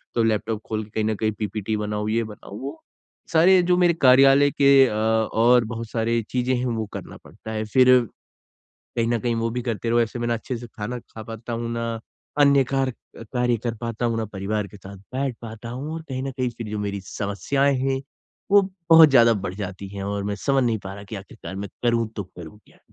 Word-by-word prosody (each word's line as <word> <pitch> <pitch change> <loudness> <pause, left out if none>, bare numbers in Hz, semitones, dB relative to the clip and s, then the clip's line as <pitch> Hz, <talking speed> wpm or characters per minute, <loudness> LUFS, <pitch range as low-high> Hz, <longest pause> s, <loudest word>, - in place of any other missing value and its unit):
तो 115 - +3
लैपटॉप 110 0 0
खोल 110 0 -2
के 105 - -19
कहीं 110 0 -1
ना 110 -1 0
कहीं 110 +1 0
पीपीटी 105 0 -2
बनाओ, 105 0 -2
ये 115 +2 +1
बनाओ, 105 -2 -10
वो 140 +4 -7 0.5
सारे 175 +4 +6
ये 180 - +4
जो 180 0 +3
मेरे 175 -1 +4
कार्यालय 135 +2 +6
के 140 -1 +6
अ, - - -3
और 110 +2 +3
बहुत 115 -1 -6
सारे 115 0 0
चीज़ें 125 0 0
हैं, 125 +1 -1
वो 115 -2 -2
करना - - -8
पड़ता 110 - -10
है। 110 0 -2
फिर, 130 -1 +7 1.0
कहीं 115 -1 +1
ना 120 -1 +1
कहीं 120 +2 -1
वो 115 0 -1
भी 125 +1 -3
करते 115 -1 -3
रहो, 120 - +4
ऐसे 115 +1 -1
मैं 120 0 -2
ना 120 - +1
अच्छे 120 +2 -4
से 120 - -8
खाना 115 +2 -6
खा 110 -1 -11
पाता 115 +2 -7
हूँ, 115 0 -3
ना 115 -1 -3 0.4
अन्य 140 -2 +6
कार 135 -1 +2 0.3
अ, - - -9
कार्य 125 -1 +2
कर 115 - -1
पाता 115 0 -3
हूँ, 115 - 0
ना 110 - -1
परिवार 100 +2 -2
के 105 - -13
साथ 100 +1 -11 0.2
बैठ 135 -2 -1
पाता 115 0 -8
हूँ 145 +6 -5
और 165 - -6
कहीं 130 0 -3
ना 135 - -3
कहीं 130 -2 -2
फिर 115 - -5
जो 105 - -3
मेरी 100 -1 -3
समस्याएँ 135 +7 0
हैं, 135 0 0 0.5
वो 205 - +7 0.3
बहुत 160 -1 +10
ज़्यादा 115 -3 +6
बढ़ 90 - -3
जाती 95 -1 -6
हैं, 100 - -4
और 100 0 -2
मैं 100 0 -2
समझ 135 -1 +3
नहीं 115 -2 +1
पा 95 0 -6
रहा 100 - -10
कि 110 +2 -7
आखिरकार 95 0 -9
मैं 100 +1 -5
करूँ 115 -2 +1
तो 105 - -2
करूँ 90 +1 -12
क्या? - - -23
115 Hz, 230 wpm, -23 LUFS, 110-130 Hz, 1.0 s, बहुत